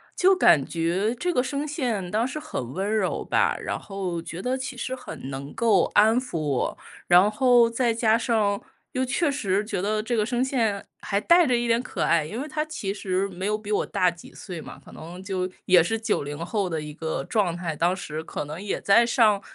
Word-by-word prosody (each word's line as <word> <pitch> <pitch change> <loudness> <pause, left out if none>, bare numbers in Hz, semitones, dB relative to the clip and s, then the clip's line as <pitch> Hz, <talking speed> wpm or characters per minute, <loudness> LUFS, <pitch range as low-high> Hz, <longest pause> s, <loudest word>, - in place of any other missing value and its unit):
就 380 +1 +5
感 150 - +5
觉 175 +7 0
这 355 +8 -1
个 250 - +2
声 285 +2 -3
线 235 - -2
当 220 +3 +1
时 290 +4 -4
很 130 - -5
温 200 +4 -1
柔 200 -4 -1
吧， - - +2
然 - - -3
后 185 -4 -4
觉 170 +1 -7
得 255 +3 -1
其 260 -1 -6
实 260 +1 -3
很 135 - -8
能 140 +1 -6
够 220 -6 +3
安 220 +3 +5
抚 250 -10 -5
我， 145 -4 -1 0.3
然 180 +4 +6
后 245 0 +5
再 230 0 +1
加 225 -1 +3
上 215 -4 +1 0.3
又 255 - -1
确 280 +4 +1
实 200 -4 0
觉 190 -4 -3
得 215 +1 0
这 240 +1 -1
个 215 - +2
声 245 +3 0
线 225 -7 0 0.2
还 200 -1 0
带 340 +8 +5
着 250 -2 +3
一 240 0 -1
点 230 +1 +2
可 - - -4
爱， 165 -2 +3
因 215 +10 -5
为 290 - -4
他 305 0 -2
其 210 -11 -4
实 190 -1 -1
没 185 +1 -4
有 210 0 +1
比 215 -1 -8
我 - - +2
大 180 -1 +1
几 170 - -14
岁 175 -5 -8
嘛， - - -10
可 - - -13
能 175 +3 -10
就 185 -2 -2 0.2
也 180 -2 +6
是 225 +6 -1
90 145 -9 -2
后 200 -2 -1
的 165 -2 -2
一 150 -1 -7
个 160 0 -3
状 195 -7 0
态， 170 -3 -3
当 175 +4 +1
时 155 -4 -5
可 150 - -5
能 155 +5 -7
也 205 - -3
在 200 +4 +5
上 225 -4 +3
210 Hz, 235 characters per minute, -25 LUFS, 180-240 Hz, 0.3 s, 然